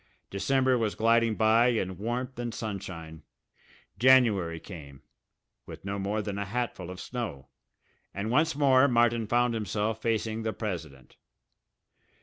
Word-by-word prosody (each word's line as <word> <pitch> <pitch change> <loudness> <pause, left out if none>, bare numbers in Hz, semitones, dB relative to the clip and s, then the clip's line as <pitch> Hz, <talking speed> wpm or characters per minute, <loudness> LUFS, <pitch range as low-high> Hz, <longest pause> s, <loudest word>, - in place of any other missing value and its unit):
December 130 +5 +2
was 110 -2 -1
gliding 115 0 +3
by 110 +2 +4
in 95 -6 0
warmth 120 +4 -3
and 120 -1 -4
sunshine. 90 -8 -6 0.8
January 110 -10 +4
came, 70 -7 -11 0.6
with - - -10
no 100 0 -3
more 105 +2 -2
than 100 -1 -4
a - - -1
hatful 100 -4 -4
of 90 0 -8
snow, 115 - -6 0.6
and 105 +3 -4
once 155 +4 +2
more 140 -2 +5
Martin 120 -3 +2
found 120 +1 +2
himself 110 0 -2
facing 115 -1 -1
the 110 -1 -2
president. 80 - -6
110 Hz, 130 wpm, -28 LUFS, 100-120 Hz, 0.8 s, more